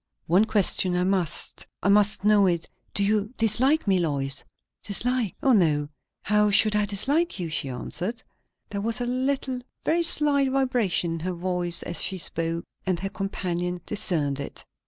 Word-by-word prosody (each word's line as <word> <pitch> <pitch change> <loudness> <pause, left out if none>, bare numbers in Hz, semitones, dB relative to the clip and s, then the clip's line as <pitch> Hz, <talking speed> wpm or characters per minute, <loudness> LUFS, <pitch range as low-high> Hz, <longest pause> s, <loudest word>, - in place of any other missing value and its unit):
"One 185 +6 +4
question 195 -4 +1
I 180 - +1
must. 185 -4 -2 0.2
I 200 - +2
must 205 0 +3
know 210 -2 +5
it. 170 -2 -1 0.3
Do 200 - +3
you 210 +1 +1
dislike 255 +8 +3
me, 190 -3 +2
Lois?" 140 -5 -2 0.4
"Dislike? 235 +1 0
O 270 - +4
no! 150 -8 +2 0.3
how 210 +1 +3
should 210 +1 +4
I 210 0 +2
dislike 275 - +1
you?" 170 -3 -4
she 140 -3 -1
answered. 180 - -3 0.5
There 200 -1 -3
was 225 +2 0
a 245 - -1
little, 260 +1 -1 0.2
very 335 +2 +2
slight, 290 -4 +2
vibration 250 -10 +1
in 165 - -4
her 180 +3 -3
voice 175 -1 -1
as 175 - -3
she 190 - 0
spoke, 165 -1 -2 0.2
and 185 -3 -1
her 195 - -2
companion 180 -3 -3
discerned 160 -10 0
it. 140 - -7
200 Hz, 165 wpm, -25 LUFS, 175-230 Hz, 0.5 s, know